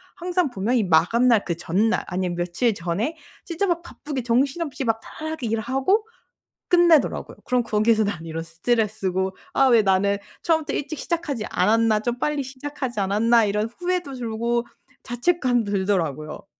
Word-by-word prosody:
항상 355 -5 -1
보면 215 +4 -1
이 235 - +3
마감날 210 +7 +4
그 170 -2 -2
전날 205 +7 +1
아니면 180 -1 -2
며칠 180 +7 0
전에 200 - -2 0.3
진짜 345 +3 -1
막 345 -2 0
바쁘게 295 -5 -6
정신없이 270 +5 0
막 225 -2 0
다다닥 315 -1 -7
일하고 265 - 0 0.6
끝내더라고요. 345 -4 +3
그럼 250 -1 +1
거기에서 220 0 +2
나는 175 -5 -3
이런 165 0 -4
스트레스고 190 +1 -1 0.2
'아 270 - +4
왜 235 -3 +5
나는 200 +1 +2 0.2
처음부터 320 -2 0
일찍 295 +1 -3
시작하지 310 -10 -2
않았나. 220 -1 +2
좀 240 +1 -2
빨리 295 0 0
시작하지 265 -3 -5
않았나.' 220 +4 +3
이런 210 +2 -1
후회도 355 -6 -2
들고 235 0 -2 0.4
자책감도 245 -4 0
들더라고요. 175 -6 -1
235 Hz, 360 characters per minute, -23 LUFS, 200-280 Hz, 0.6 s, 왜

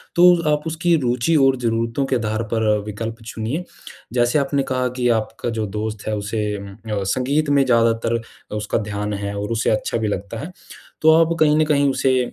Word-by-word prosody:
तो 175 0 +6
आप 150 0 0
उसकी 165 +2 +1
रुचि 125 +5 +1
और 135 0 +4
ज़रूरतों 115 +2 -1
के 135 - 0
आधार 110 -1 -1
पर 110 -1 +1
अ, - - +3
विकल्प 115 +2 -5
चुनिए। 115 +9 -3 0.5
जैसे 120 +4 +2
आपने 140 0 0
कहा 130 -1 -1
कि 125 -1 +1
आपका 115 +2 -5
जो 110 - 0
दोस्त 110 -1 -4
है, 110 - 0
उसे 105 0 -2
उम, 100 0 -8
अ, 105 -1 -4
संगीत 145 +4 0
में 140 -1 +4
ज़्यादातर 115 -1 +2 0.4
उसका 105 0 -1
ध्यान 105 0 -3
है 100 0 -4
और 105 +2 -3
उसे 115 0 +1
अच्छा 110 +1 0
भी 110 -1 -1
लगता 100 +2 -4
है। 160 +8 -6 0.5
तो 160 - +6
आप 165 +1 -1
कहीं 150 -1 +4
न 155 - +3
कहीं 145 -2 +3
उसे 130 -1 +2
115 Hz, 200 wpm, -21 LUFS, 110-140 Hz, 0.5 s, तो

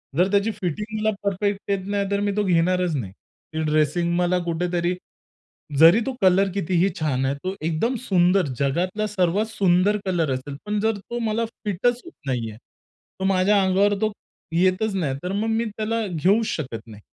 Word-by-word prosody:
जर 180 +4 +4
त्याची 205 +2 +2
फिटिंग 210 +6 -3
मला 215 - +2
परफेक्ट 200 +1 -1
येत 190 -1 -1
नाहीतर 200 0 0
मी 205 0 0
तो 210 - +2
घेणारच 180 -1 +2
नाही. 100 -9 -4
ती 160 +9 -9
ड्रेसिंग 155 +3 +1
मला 180 +1 +2
कुठेतरी 175 +1 -1 0.8
जरी 165 +7 +8
तो 270 - -2
कलर 190 +1 +4
कितीही 185 -1 +1
छान 135 -4 0
आहे 135 +1 0
तो 185 - -2
एकदम 165 +11 0
सुंदर, 180 -1 +3
जगातला 180 +9 0
सर्वात 195 +1 +1
सुंदर 195 +1 +2
कलर 170 -6 0
असेल. 140 +2 -5
पण 210 0 -1
जर 220 0 +1
तो 235 +5 -6
मला 230 +2 0
फिटच 230 +2 -1
होत 345 - -10 0.2
नाही 120 -4 -1
आहे, 110 - -11 0.6
तर 190 - -1
माझ्या 195 +1 +3
अंगावर 195 +2 +3
तो 215 -1 +1 0.4
येतच 185 +4 +2
नाही, 150 -8 -1
तर 180 - -3
मग 210 +3 -1
मी 225 +1 +1
त्याला 220 +1 -2
घेऊच 190 +6 +2
शकत 130 -7 -3
नाही. 105 -2 -12
185 Hz, 175 wpm, -23 LUFS, 165-205 Hz, 0.8 s, जरी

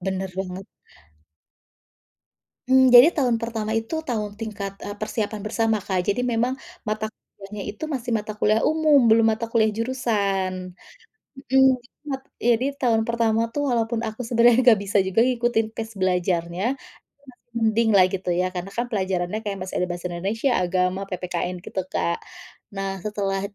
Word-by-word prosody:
Bener 190 0 -3
banget. 190 0 -5 2.0
Hmm, 260 -1 +6
jadi 260 +9 +9
tahun 250 -7 +1
pertama 225 -2 -3
itu 225 +7 -5
tahun 210 -3 -2
tingkat, 200 -3 -5
e - - -6
persiapan 215 0 -3
bersama, 225 0 +1
Kak, 190 -2 -1
jadi 225 +6 0
memang, 245 +3 0 0.2
mata 215 0 -2
kuliahnya 205 -1 -11
itu 220 - -7
masih 255 -6 -4
mata 210 0 -6
kuliah 215 +1 +2
umum, 305 -5 +4
belum 225 +1 +5
mata 225 +1 -2
kuliah 225 -1 +2
jurusan. 200 -6 -1 0.6
Mhm. 270 - -12
Jadi 265 - +2 0.5
mat 265 0 -3 0.2
jadi 240 +2 +2
tahun 230 -4 +2
pertama 230 -1 +1
itu 290 - -5
walaupun 230 -1 0
aku 220 +3 -6
sebenarnya 235 0 +4
enggak 240 -4 +6
bisa 205 +1 +2
juga 190 +3 -3
ngikutin 240 -3 +1
pace 225 0 -6
belajarnya, 180 -1 0 0.2
itu - - -17 0.4
masih 240 -1 -32
mending 220 0 +2
lah 185 - +7
gitu 190 -1 -4
ya, - - +2
karena 180 +2 -5
kan 240 +1 0
pelajarannya 190 0 -1
kayak 200 -2 -3
masih 185 - -6
ada - - +1
bahasa 175 +1 -4
Indonesia, 205 +9 -1
Agama, 180 +1 0
PPKN 180 0 -3
gitu, 190 - -3
Kak. 170 - -1 0.6
Nah, 195 -1 -4
setelah 200 -2 -2
215 Hz, 160 wpm, -23 LUFS, 190-235 Hz, 2.0 s, jadi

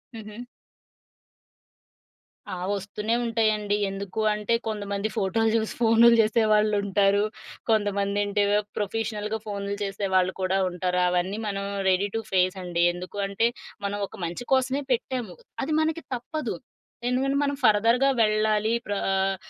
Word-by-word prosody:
హుహు. 215 0 -9 2.1
ఆ! - - -3 0.2
ఒస్తూనే 210 +3 -2
ఉంటాయండి. 215 -3 +1
ఎందుకు 195 +2 -4
అంటే 210 +2 -1
కొంతమంది 205 -1 -2
ఫోటోలు 225 +4 +1
చూసి 220 -1 0
ఫోనులు 230 +1 +6
చేసేవాళ్ళుంటారు. 210 -2 +2 0.5
కొంతమంది 205 -2 +1
అంటే 205 0 +1 0.3
ప్రొఫెషనల్‌గా 215 +1 -2
ఫోనులు 200 -1 -4
చేసేవాళ్ళు 190 -2 0
కూడా 185 +1 +1
ఉంటారు. 180 0 -1
అవన్నీ 180 +3 0
మనం 200 -1 -2 0.3
రెడీ 190 +2 +2
టు 225 - 0
ఫేస్ 185 0 +2
అండి. 175 -1 0
ఎందుకంటే 195 +4 -1 0.4
మనం 200 +1 -2
ఒక - - -13
మంచి 170 +7 -5
కోసమే 265 +1 +2
పెట్టాము. 240 -6 -2 0.3
అది 290 - -3
మనకి 320 +1 -1
తప్పదు. 245 - -4 0.5
ఎందుకంటే 265 +2 +1
మనం 285 0 0
ఫర్‌ధర్‌గా 230 +5 +4
వెళ్ళాలి. 215 0 +2
ప్ర 205 - -2 0.2
ఆహ్, 195 0 +1
210 Hz, 120 wpm, -26 LUFS, 195-225 Hz, 2.1 s, ఫోనులు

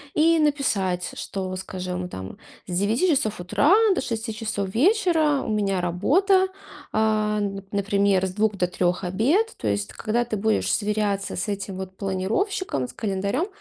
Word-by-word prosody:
и 325 +1 +4
написать, 210 - 0
что, 190 -1 -4
скажем, 180 -1 -4
там 95 - -8 0.3
с 180 0 -1
9 225 - +2
часов 215 - +1
утра 285 - +3 0.2
до - - -1
6 225 -2 -3
часов 205 -3 -3
вечера 320 - +3
у - - -5
меня 200 -3 0
работа, 370 - +3 0.5
а, 215 -1 +1
н 195 -1 -3
например, 200 -1 +2
с 185 - -5
2 210 0 +1
до 180 - +2
3- 180 +1 0
обед. 265 - +1
То 110 - -4
есть, 100 0 -1
когда 235 +3 0
ты 225 -3 -3
будешь 220 +2 +1
сверяться 205 -2 -1
с 205 - -2
этим 195 -1 -4
вот 190 0 -7
планировщиком, 195 - -1
с - - -12
календарём, 200 - -1
205 Hz, 160 wpm, -24 LUFS, 190-250 Hz, 0.5 s, и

